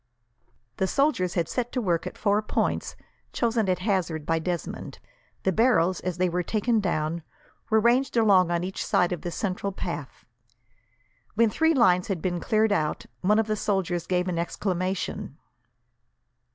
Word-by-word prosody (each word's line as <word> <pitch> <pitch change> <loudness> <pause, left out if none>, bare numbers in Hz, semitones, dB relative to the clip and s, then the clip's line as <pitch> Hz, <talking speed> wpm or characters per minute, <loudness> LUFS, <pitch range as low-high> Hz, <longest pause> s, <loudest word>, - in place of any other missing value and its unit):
The 190 - +1
soldiers 275 - +1
had 170 -2 +1
set 245 -1 -2
to 255 - 0
work 175 -7 0
at - - -8
four 205 0 +2
points, 215 - -1 0.4
chosen 230 -4 +1
at 180 - +2
hazard 180 -6 -1
by 165 0 +1
Desmond. 175 +1 -4 0.5
The 190 - +2
barrels, 185 -5 +3
as 180 -1 -4
they 185 0 +2
were 180 +1 -1
taken 220 +5 +1
down, 170 -3 -1 0.5
were 220 - +4
ranged 240 +3 +2
along 195 -6 +5
on 170 0 0
each 190 +1 -4
side 180 0 +2
of 175 - -3
the 175 - -4
central 195 +3 -2
path. 170 -7 -6 1.1
When 225 0 +3
three 320 +5 +2
lines 180 -8 +4
had 195 -4 -2
been 175 +1 -2
cleared 215 +3 +2
out, 155 -6 0 0.2
one 210 +3 +3
of 220 - +3
the 215 0 -1
soldiers 185 -5 -1
gave 180 0 0
an 175 -2 -1
exclamation. 185 +1 -3
185 Hz, 165 wpm, -26 LUFS, 175-215 Hz, 1.1 s, along